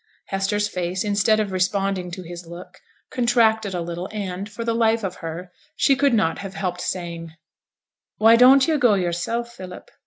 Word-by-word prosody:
Hester's 200 Hz, +2 st, 0 dB
face, 180 Hz, -1 st, -3 dB
instead 210 Hz, +1 st, +2 dB
of 210 Hz, -2 st, -1 dB
responding 190 Hz, 0 st, -1 dB
to 180 Hz, +1 st, -7 dB
his 175 Hz, 0 st, -9 dB
look, 180 Hz, +2 st, -11 dB, 0.3 s
contracted 225 Hz, -5 st, +2 dB
a 175 Hz, -, -2 dB
little, 175 Hz, +2 st, -5 dB
and, 200 Hz, -1 st, -5 dB
for 220 Hz, +2 st, -6 dB
the 230 Hz, 0 st, -1 dB
life 225 Hz, -1 st, +2 dB
of 185 Hz, -2 st, -4 dB
her, 170 Hz, +2 st, -7 dB, 0.2 s
she 275 Hz, -, +3 dB
could 275 Hz, -2 st, +2 dB
not 165 Hz, -7 st, +1 dB
have 195 Hz, -1 st, -7 dB
helped 180 Hz, -2 st, -3 dB
saying, 170 Hz, -2 st, -5 dB, 0.8 s
'Why 225 Hz, +2 st, +6 dB
don't 260 Hz, +3 st, +6 dB
yo' 315 Hz, -2 st, +1 dB
go 240 Hz, -6 st, +4 dB
yourself, 195 Hz, +7 st, -2 dB
Philip?' 185 Hz, -5 st, -10 dB
195 Hz, 175 wpm, -22 LUFS, 180-225 Hz, 0.8 s, Why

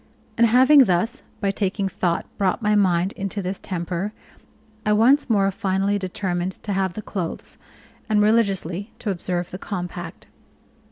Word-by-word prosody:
And 235 Hz, 0 st, +5 dB
having 260 Hz, +4 st, +7 dB
thus, 195 Hz, +7 st, 0 dB, 0.2 s
by 200 Hz, -2 st, +1 dB
taking 195 Hz, 0 st, -1 dB
thought, 175 Hz, -3 st, -1 dB
brought 190 Hz, -2 st, +1 dB
my 210 Hz, 0 st, +3 dB
mind 185 Hz, -2 st, +2 dB
into 200 Hz, 0 st, -4 dB
this 190 Hz, 0 st, -3 dB
temper, 180 Hz, +3 st, -3 dB, 0.7 s
I 210 Hz, -, +2 dB
once 255 Hz, +7 st, +4 dB
more 195 Hz, -3 st, +3 dB
finally 195 Hz, 0 st, 0 dB
determined 185 Hz, -1 st, -2 dB
to 205 Hz, -, -2 dB
have 190 Hz, -2 st, 0 dB
the 215 Hz, -, -7 dB
clothes, 180 Hz, -4 st, -5 dB, 0.5 s
and 215 Hz, -1 st, +3 dB
religiously 200 Hz, -3 st, +1 dB
to 210 Hz, -, -2 dB
observe 175 Hz, -1 st, -3 dB
the 185 Hz, -, -6 dB
compact. 175 Hz, -4 st, -6 dB
195 Hz, 150 wpm, -23 LUFS, 180-210 Hz, 0.7 s, having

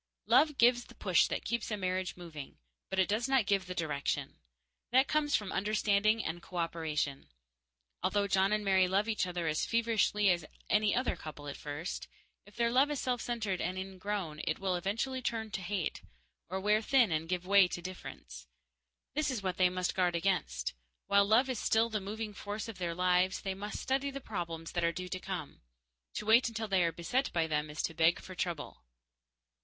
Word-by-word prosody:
Love 300 Hz, -2 st, +4 dB
gives 240 Hz, +1 st, +4 dB
the -, -, -16 dB
push -, -, +3 dB
that -, -, -3 dB
keeps 235 Hz, -2 st, -2 dB
a 210 Hz, -, -2 dB
marriage 185 Hz, -1 st, -2 dB
moving, 160 Hz, -5 st, -9 dB, 0.3 s
but 190 Hz, -, -3 dB
it 190 Hz, -1 st, +4 dB
does 225 Hz, +5 st, 0 dB
not 265 Hz, -5 st, +4 dB
give 195 Hz, -3 st, +1 dB
the 180 Hz, -, -5 dB
direction. 150 Hz, -4 st, -2 dB, 0.5 s
That 260 Hz, +2 st, +5 dB
comes 300 Hz, -1 st, +2 dB
from 205 Hz, -3 st, -1 dB
understanding 215 Hz, +1 st, +2 dB
and 170 Hz, +2 st, -3 dB
cooperation. 160 Hz, -5 st, -2 dB, 0.7 s
Although 205 Hz, -1 st, +1 dB
John 195 Hz, 0 st, +2 dB
and 210 Hz, 0 st, 0 dB
Mary 190 Hz, -1 st, +4 dB
love 195 Hz, +4 st, +1 dB
each 215 Hz, -4 st, 0 dB
other 175 Hz, -1 st, -3 dB
as 155 Hz, -1 st, 0 dB
feverishly 225 Hz, -3 st, +2 dB
as 175 Hz, -2 st, 0 dB, 0.3 s
any 210 Hz, -1 st, +3 dB
other 255 Hz, -, +1 dB
couple 150 Hz, -2 st, -9 dB
at 140 Hz, -, -5 dB
first, 150 Hz, +4 st, -5 dB, 0.4 s
if 205 Hz, -, -17 dB
their 235 Hz, 0 st, +1 dB
loved 265 Hz, +4 st, +4 dB
is 290 Hz, -, -2 dB
self 250 Hz, -2 st, -1 dB
centered 215 Hz, -6 st, -2 dB
and 180 Hz, +2 st, -2 dB
ingrown, 190 Hz, -4 st, -4 dB
it 155 Hz, -, 0 dB
will 190 Hz, -1 st, -1 dB
eventually 225 Hz, +9 st, -1 dB
turn 225 Hz, -2 st, -2 dB
to 195 Hz, -, -3 dB
hate, 185 Hz, -2 st, -2 dB, 0.5 s
or 190 Hz, +2 st, -2 dB
wear 210 Hz, +2 st, +3 dB
thin 240 Hz, -3 st, +4 dB
and 160 Hz, +1 st, -1 dB
give 180 Hz, -1 st, -1 dB
way 200 Hz, -1 st, +6 dB
to 175 Hz, -, -5 dB
indifference. 170 Hz, -, -9 dB, 0.7 s
This 300 Hz, +1 st, 0 dB
is 240 Hz, -6 st, -3 dB
what 185 Hz, -1 st, -2 dB
they 185 Hz, -1 st, +5 dB
must 180 Hz, 0 st, -1 dB
guard 180 Hz, -2 st, +1 dB
against. 65 Hz, -, 0 dB, 0.3 s
While 200 Hz, 0 st, +4 dB
love 225 Hz, +6 st, +4 dB
is 255 Hz, -4 st, -2 dB
still 225 Hz, +1 st, +2 dB
the 215 Hz, -2 st, -1 dB
moving 210 Hz, +2 st, -5 dB
force 205 Hz, +2 st, -5 dB
of 220 Hz, -5 st, -8 dB
their 170 Hz, -2 st, -2 dB
lives, 180 Hz, +1 st, +2 dB
they 195 Hz, -1 st, -2 dB
must 205 Hz, +2 st, -5 dB
study 270 Hz, +1 st, 0 dB
the 275 Hz, 0 st, -5 dB
problems 170 Hz, -8 st, -5 dB
that 175 Hz, -, -1 dB
are 170 Hz, -, +3 dB
due 180 Hz, +1 st, -6 dB
to 185 Hz, -, -3 dB
come. -, -, -6 dB, 0.5 s
To 210 Hz, -, -3 dB
wait 230 Hz, +4 st, +6 dB
until 225 Hz, -1 st, -4 dB
they 190 Hz, -3 st, +3 dB
are 170 Hz, -, +2 dB
beset 245 Hz, -, -1 dB
by 165 Hz, -2 st, +1 dB
them 150 Hz, -1 st, -1 dB
is 150 Hz, -, -4 dB
to 165 Hz, -, -1 dB
beg 165 Hz, +1 st, +3 dB
for 185 Hz, -, -10 dB
trouble. 170 Hz, -4 st, -4 dB
195 Hz, 200 wpm, -32 LUFS, 175-220 Hz, 0.7 s, way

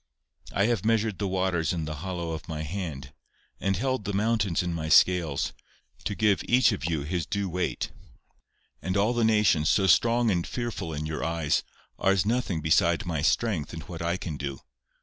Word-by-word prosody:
I 100 Hz, -, +2 dB
have 115 Hz, -5 st, +1 dB
measured 110 Hz, -2 st, +1 dB
the 100 Hz, -, 0 dB
waters 95 Hz, -3 st, 0 dB
in 80 Hz, -3 st, -2 dB
the 75 Hz, -1 st, -5 dB
hollow 85 Hz, 0 st, -4 dB
of 80 Hz, -1 st, -6 dB
my 80 Hz, -1 st, -4 dB
hand, 75 Hz, -6 st, -5 dB, 0.5 s
and 95 Hz, -1 st, 0 dB
held 130 Hz, +1 st, -1 dB
the 100 Hz, -, -3 dB
mountains 105 Hz, -4 st, +1 dB
in 90 Hz, -1 st, -2 dB
my 80 Hz, -1 st, -3 dB
scales, 80 Hz, -3 st, +3 dB, 0.5 s
to 105 Hz, -, -2 dB
give 105 Hz, -2 st, +2 dB
each 125 Hz, -1 st, +4 dB
his 80 Hz, -3 st, -2 dB
due 100 Hz, -1 st, -1 dB
weight, 90 Hz, 0 st, -2 dB, 0.9 s
and 95 Hz, +2 st, -1 dB
all 105 Hz, +4 st, +2 dB
the 120 Hz, -1 st, +1 dB
nations, 105 Hz, -8 st, +3 dB
so 100 Hz, -, +3 dB
strong 115 Hz, +6 st, +4 dB
and 85 Hz, -3 st, 0 dB
fearful 115 Hz, -8 st, -4 dB
in 75 Hz, 0 st, -4 dB
your 75 Hz, 0 st, -3 dB
eyes, 80 Hz, -2 st, +1 dB, 0.4 s
are 95 Hz, -, +3 dB
as 95 Hz, 0 st, +1 dB
nothing 110 Hz, -7 st, 0 dB
beside 85 Hz, +2 st, +2 dB
my 80 Hz, -4 st, -2 dB
strength 90 Hz, 0 st, 0 dB
and 80 Hz, -, -6 dB
what 85 Hz, -4 st, -8 dB
I 85 Hz, +2 st, 0 dB
can 80 Hz, -5 st, -5 dB
do. 70 Hz, -1 st, -5 dB
90 Hz, 185 wpm, -27 LUFS, 80-105 Hz, 0.9 s, each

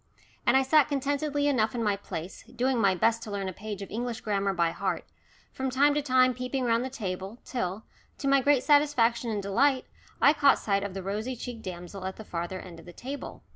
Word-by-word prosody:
And 240 Hz, +3 st, +6 dB
I 265 Hz, -, +4 dB
sat 295 Hz, +2 st, +5 dB
contentedly 285 Hz, +1 st, 0 dB
enough 225 Hz, -5 st, +1 dB
in 235 Hz, -, -1 dB
my 205 Hz, -2 st, +2 dB
place, 180 Hz, -3 st, -7 dB
doing 250 Hz, +1 st, 0 dB
my 195 Hz, -2 st, +4 dB
best 230 Hz, +5 st, +2 dB
to 225 Hz, -, -7 dB
learn 200 Hz, -1 st, -3 dB
a 185 Hz, -, -4 dB
page 205 Hz, +1 st, -6 dB
of -, -, -10 dB
English 240 Hz, +1 st, -3 dB
grammar 200 Hz, -2 st, 0 dB
by 170 Hz, -3 st, +1 dB
heart, -, -, -2 dB, 0.5 s
from 265 Hz, 0 st, -2 dB
time 280 Hz, +3 st, +4 dB
to 295 Hz, -, +1 dB
time 255 Hz, -2 st, +4 dB
peeping 255 Hz, +1 st, -2 dB
round 230 Hz, 0 st, +2 dB
the 260 Hz, -, -3 dB
table, 195 Hz, -3 st, -5 dB
till, 210 Hz, -4 st, -3 dB, 0.3 s
to 275 Hz, -, -3 dB
my 275 Hz, 0 st, +5 dB
great 280 Hz, -1 st, +3 dB
satisfaction 255 Hz, -6 st, +3 dB
and 210 Hz, -2 st, -2 dB
delight, 260 Hz, +7 st, +2 dB, 0.3 s
I 290 Hz, -, +6 dB
caught 285 Hz, -2 st, +5 dB
sight 200 Hz, -2 st, 0 dB
of 200 Hz, -2 st, -5 dB
the 195 Hz, -, -4 dB
rosy 215 Hz, +6 st, -3 dB
cheeked 240 Hz, -1 st, -7 dB
damsel 185 Hz, +1 st, -7 dB
at 190 Hz, -, -5 dB
the 220 Hz, -, -10 dB
farther 175 Hz, +1 st, -4 dB
end 175 Hz, -3 st, -10 dB
of 165 Hz, -, -15 dB
the 175 Hz, -, -10 dB
table. 275 Hz, +7 st, -7 dB
230 Hz, 220 wpm, -28 LUFS, 195-265 Hz, 0.5 s, And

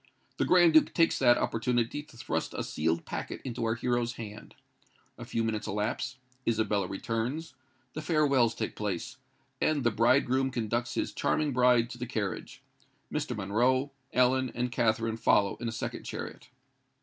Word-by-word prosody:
The -, -, +1 dB
Grand 175 Hz, -3 st, +6 dB
Duke 155 Hz, -, +5 dB
takes 165 Hz, -1 st, +3 dB
that 120 Hz, 0 st, +6 dB
opportunity 120 Hz, +4 st, 0 dB
to 145 Hz, -, -17 dB
thrust 80 Hz, -8 st, -3 dB
a -, -, -2 dB
sealed 80 Hz, +2 st, -1 dB
packet -, -, -5 dB
into 120 Hz, -2 st, -3 dB
our 115 Hz, 0 st, +1 dB
hero's 120 Hz, 0 st, 0 dB
hand. 110 Hz, -2 st, -9 dB, 0.6 s
A -, -, -9 dB
few 115 Hz, -, -1 dB
minutes 110 Hz, -2 st, -2 dB
elapse—Isabella 110 Hz, -1 st, -2 dB
returns—the 130 Hz, -, -5 dB
farewells 140 Hz, -8 st, +3 dB
take 110 Hz, -, -3 dB
place—and 130 Hz, -, -3 dB
the 120 Hz, -, +3 dB
bridegroom 130 Hz, +4 st, +3 dB
conducts 120 Hz, -1 st, -2 dB
his -, -, -1 dB
charming 150 Hz, -3 st, 0 dB
bride 125 Hz, -1 st, +4 dB
to 120 Hz, -, -8 dB
the 125 Hz, -, -4 dB
carriage. 105 Hz, -4 st, -4 dB, 0.5 s
Mr. -, -, -2 dB
Monroe, 125 Hz, +8 st, +1 dB, 0.2 s
Ellen, 125 Hz, 0 st, +3 dB
and 125 Hz, +1 st, -1 dB
Katherine 115 Hz, -1 st, +1 dB
follow 105 Hz, -3 st, +3 dB
in 120 Hz, -, -4 dB
a -, -, -1 dB
second 110 Hz, -, -5 dB
chariot. -, -, -7 dB
120 Hz, 150 wpm, -29 LUFS, 110-130 Hz, 0.6 s, Grand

